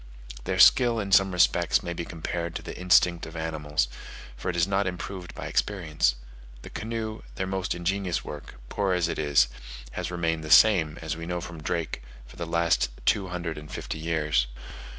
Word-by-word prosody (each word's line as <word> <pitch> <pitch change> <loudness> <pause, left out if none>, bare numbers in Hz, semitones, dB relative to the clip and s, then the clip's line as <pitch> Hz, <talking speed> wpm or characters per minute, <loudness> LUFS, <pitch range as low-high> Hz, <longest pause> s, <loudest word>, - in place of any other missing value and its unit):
Their - - -1
skill 120 -3 +6
in 100 -2 -4
some 95 0 +5
respects 90 -1 +3
may 85 - -3
be 85 0 -4
compared 85 +1 -4
to - - -5
the - - -7
instinct 90 -2 +3
of 80 - -11
animals; 75 -5 -1 0.5
for - - -4
it 90 - -2
is 85 -1 +3
not 100 0 +1
improved 90 0 -6
by - - -6
experience: 75 -11 0 0.5
the - - -10
canoe, 110 -1 -4
their 95 - -2
most 95 -1 -2
ingenious 90 +1 -1
work, 75 -3 -8
poor 100 +6 0
as 90 -2 +1
it - - -3
is, 70 -4 +4 0.4
has - - -4
remained 80 -2 -1
the 80 - -6
same, 80 -5 +6
as 80 -1 -2
we 85 0 -7
know 90 0 -2
from 85 -2 -8
Drake, 85 -3 -2 0.2
for - - -15
the 85 - -5
last 85 -5 +2 0.2
two 100 -2 +2
hundred 85 -3 -4
and 75 0 -12
fifty 80 - -5
years. 75 -6 +1
85 Hz, 190 wpm, -27 LUFS, 80-95 Hz, 0.5 s, skill